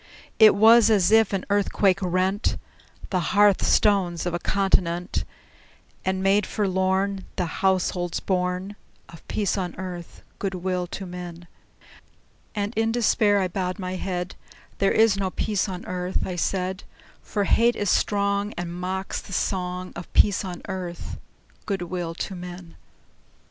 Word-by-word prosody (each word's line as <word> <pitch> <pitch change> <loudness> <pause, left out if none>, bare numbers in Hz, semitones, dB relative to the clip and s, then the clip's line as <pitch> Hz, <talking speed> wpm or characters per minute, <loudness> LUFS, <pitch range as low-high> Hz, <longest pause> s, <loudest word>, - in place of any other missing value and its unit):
It 215 -1 +8
was 225 +2 +7
as 205 -3 +4
if 220 -1 +5
an 195 -2 -2
earthquake 200 -1 +2
rent 185 +3 0 0.5
The 185 - +2
hearth 205 +2 +3
stones 185 -5 +2
of 175 - -2
a 175 - -1
continent, 180 -2 0 0.8
And 190 0 -1
made 195 0 +3
forlorn 190 0 0
The 180 - 0 0.2
households 185 -2 +1
born 180 +1 -2 0.3
Of 165 - -13
peace 205 -1 -1
on 180 -2 -3
earth, 180 -2 -8 0.2
good 195 -2 -2
will 180 0 -2
to 190 +2 -6
men! 175 -1 -8 1.1
And 205 +1 -2
in 225 +1 +1
despair 220 -3 +3
I 190 - +1
bowed 180 0 -3
my 185 -2 -4
head; 180 -1 -3 0.5
"There 195 - +3
is 220 -2 +4
no 195 -1 -1
peace 205 +1 -1
on 185 -1 -6
earth," 180 0 -2
I 185 - -4
said: 185 +1 -2 0.4
"For 205 - -2
hate 235 +4 +3
is 205 -3 0
strong, 200 0 +1
And 175 0 -4
mocks 185 +2 -3
the 195 - -10
song 180 -1 -2
Of 170 - -8
peace 205 -1 +4
on 180 -2 -6
earth, 180 -3 -5 0.5
good 195 -3 -1
will 175 -1 -4
to 195 - -4
men!" 175 -1 -9
190 Hz, 150 wpm, -24 LUFS, 180-200 Hz, 1.1 s, It